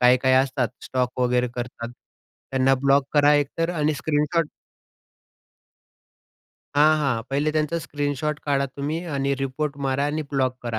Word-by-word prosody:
काय-काय 125 +1 +4
असतात 130 -3 -1 0.2
स्टॉक 125 0 -2
वगैरे 125 0 +2
करतात, 120 -1 -5 0.6
त्यांना 135 0 +3
ब्लॉक 140 +1 +3
करा 145 0 +5
एकतर 145 +4 0
आणि 155 -1 +1
स्क्रीनशॉट 150 +3 0 2.3
हां, 155 +2 +6
हां. 130 -6 0
पहिले 145 +3 +1
त्यांचा 155 +2 0
स्क्रीनशॉट 145 0 -2
काढा 140 -1 +1
तुम्ही 145 +5 -4
आणि 140 0 0
रिपोर्ट 140 +2 -2
मारा 135 +1 0
आणि 155 +1 -2
ब्लॉक 130 -2 0
करा. 115 -2 -3
140 Hz, 135 wpm, -24 LUFS, 130-150 Hz, 2.3 s, हां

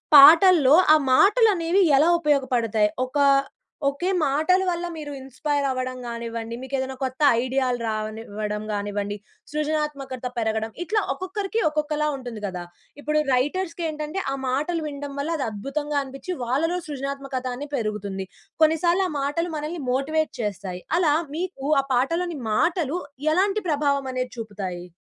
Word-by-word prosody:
పాటల్లో 310 0 +9 0.2
ఆ - - +6 0.2
మాటలు 430 - +6
అనేవి 345 +3 +2
ఎలా 315 +5 +5
ఉపయోగపడతాయి? 240 -8 +2 0.2
ఒక 265 +3 -4 0.7
ఒకే 315 +7 0 0.2
మాటల 315 +7 +2
వల్ల 350 0 -2
మీరు 295 -2 -6
ఇన్స్పైర్ 280 +2 -2
అవ్వడం 255 0 -3
గానివ్వండి. 230 -1 -5
మీకు 265 +1 -9
ఏదైనా 265 0 -3
కొత్త 260 +2 -4 0.2
ఐడియాలు 255 -1 0
రానివ్వడం 215 -1 -4
కానివ్వండి. 205 0 -3 0.3
సృజనాత్మకత 300 -4 -2
పెరగడం 220 0 -1
ఇట్లా 425 +4 +1
ఒక్కొక్కరికి 390 +7 -3
ఒక్కొక్కలా 300 0 -1
ఉంటుంది 245 -5 -7
కదా! 180 -2 -5 0.4
ఇప్పుడు 300 +1 0 0.2
రైటర్స్‌కి 335 +6 -1
ఏంటంటే 305 +4 -4
ఆ - - -1
మాటలు 305 +6 -1
వినడం 285 -1 -6
వల్ల 285 +3 -2
అది 270 - -1
అద్భుతంగా 285 +7 -3
అనిపిచ్చి 270 +6 -7
వాళ్ళలో 300 +9 0
సృజనాత్మకత 275 -2 -4
అనేది 290 +2 -8
పెరుగుతుంది. 205 -3 -3 0.4
కొన్నిసార్లు 340 +4 +3
ఆ - - -6
మాటలు 330 +5 -1
మనల్ని 305 +2 -4
మోటివేట్ 310 +4 0
చేస్తాయి. 190 -3 -4 0.2
అలా 320 -5 +3 0.2
మీకు 340 -6 -4 0.2
ఆ - - -13
పాటలోని 335 +6 0 0.2
మాటలు 335 - +1 0.4
ఎలాంటి 400 +4 +2
ప్రభావం 280 -2 +1
అనేది 255 0 -2
చూపుతాయి? 190 -5 -5
280 Hz, 135 wpm, -24 LUFS, 240-315 Hz, 0.7 s, పాటల్లో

